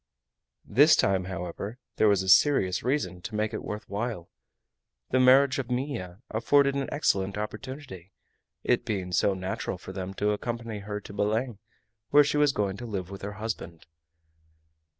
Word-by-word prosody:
This 145 +9 +6
time, 95 -2 +2
however, 95 +4 -5 0.2
there 110 - +4
was 100 -2 +3
a - - -6
serious 95 - +4
reason 115 -9 -1
to 105 - -6
make 110 0 -1
it - - -4
worth 105 0 -6
while. 105 -4 -4 0.8
The 130 - +3
marriage 130 +2 +5
of 130 -2 -4
Minha 125 -7 -4
afforded 140 +5 +3
an 140 0 -2
excellent 100 -9 0
opportunity, 105 - -7 0.5
it - - +2
being 95 -4 -3
so 95 +2 +2
natural 95 0 -4
for 95 +1 -10
them 95 0 -5
to 105 +1 +1
accompany 115 0 -4
her 105 +1 -5
to 100 - -11
Belem, 110 +2 -1 0.5
where 145 +1 +7
she 145 +1 0
was 150 -1 +4
going 100 -5 -1
to 120 - -7
live 95 -4 -4
with 100 - -8
her 100 +1 -5
husband. 105 -6 -6
105 Hz, 165 wpm, -27 LUFS, 95-130 Hz, 0.8 s, where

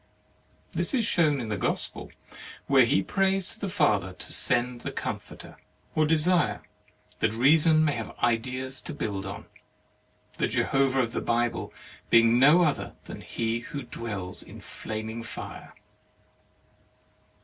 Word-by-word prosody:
This - - -1
is 235 -4 +1
shown 155 -7 +2
in 115 -3 -4
the 105 - -1
Gospel, - - -2 0.6
where 135 -3 +5
he 135 +5 +2
prays 195 -1 0
to 225 - -8
the 200 - -3
Father 105 - +1
to - - -5
send 120 0 +2
the - - -4
Comforter - - -6 0.4
or 155 -1 +2
desire 165 +3 +2 0.6
that - - +1
Reason 155 +6 +5
may 150 - +2
have 115 -3 -6
ideas 130 +3 -1
to 155 - -7
build 100 -7 -3
on, 100 +1 -7 0.9
the - - +2
Jehovah 135 -1 +2
of 115 -2 -2
the - - -3
Bible 120 0 -1 0.4
being 115 +1 +5
no 150 +7 +7
other 150 -4 -1
than - - -8
he 115 0 -2
who 140 +4 -7
dwells 100 -7 -5
in - - -12
flaming 110 +1 -6
fire. 115 - -8
130 Hz, 140 wpm, -27 LUFS, 115-155 Hz, 0.9 s, no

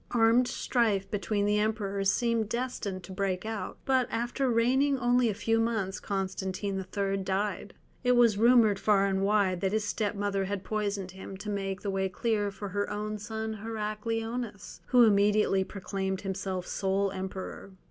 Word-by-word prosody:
Armed 235 +1 +4
strife 225 -5 0
between 205 0 0
the 210 0 +2
Emperors 200 -2 0
seemed 230 -1 0
destined 235 -6 -3
to 190 - -10
break 190 0 -2
out, 220 -3 -4
but 260 -2 +2
after 240 +3 -1
reigning 260 +4 +3
only 245 -1 +3
a - - 0
few 225 +2 +1
months 220 -4 -1
Constantine 190 0 -3
III. 195 0 +1
died. 195 +2 -2 0.3
It 250 0 +4
was 240 -3 +5
rumoured 230 -4 +5
far 200 -2 +3
and 195 -1 0
wide 195 -3 +2
that 195 0 0
his 215 0 +1
step 210 0 -1
mother 200 -1 -1
had 195 0 -3
poisoned 200 -3 -2
him, 190 +1 -9
to 210 +2 -5
make 195 -1 -3
the 200 - -2
way 190 0 0
clear 210 +1 0
for 200 0 -7
her 205 +2 -2
own 210 0 -3
son 220 +1 -4
Heracleonas, 225 -1 -4
who 250 -2 +6
immediately 205 -2 +4
proclaimed 190 -1 -4
himself 190 -2 -3
sole 195 0 0
emperor. 190 0 -6
205 Hz, 165 wpm, -29 LUFS, 195-225 Hz, 0.3 s, who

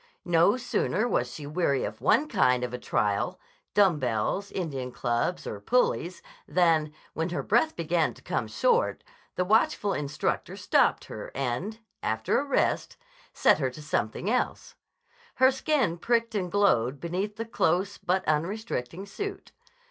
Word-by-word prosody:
No 175 +6 +4
sooner 245 -2 0
was 125 - 0
she 145 +3 -8
weary 145 -3 0
of - - -5
one 300 - +3
kind 125 - +2
of 125 -1 -3
a 125 - -4
trial, 105 -4 0 0.4
dumb 190 -7 +4
bells, 125 - -1
Indian 135 -9 -4
clubs, 120 +8 -1
or - - -5
pulleys, - - 0 0.2
than, 165 -4 +2 0.2
when 165 +2 -2
her 175 - -3
breath 245 +9 +2
began 170 0 0
to - - -17
come - - -2
short, - - +1 0.3
the 180 - 0
watchful 210 0 +2
instructor 145 0 -2
stopped - - +2
her - - -7
and, 140 - -3 0.2
after 110 +1 0
a - - -1
rest, 285 - 0 0.3
set - - +4
her 135 -3 +1
to 150 +4 -11
something 150 - -2
else. 250 +3 -1 0.6
Her 260 +1 +5
skin 265 - 0
pricked 230 +2 +1
and 185 -4 -2
glowed 140 - +2
beneath 185 +7 -3
the 225 +2 -4
close 185 -4 0
but 185 +1 0
unrestricting 170 - -2
suit. 405 - -6
175 Hz, 150 wpm, -27 LUFS, 140-220 Hz, 0.6 s, Her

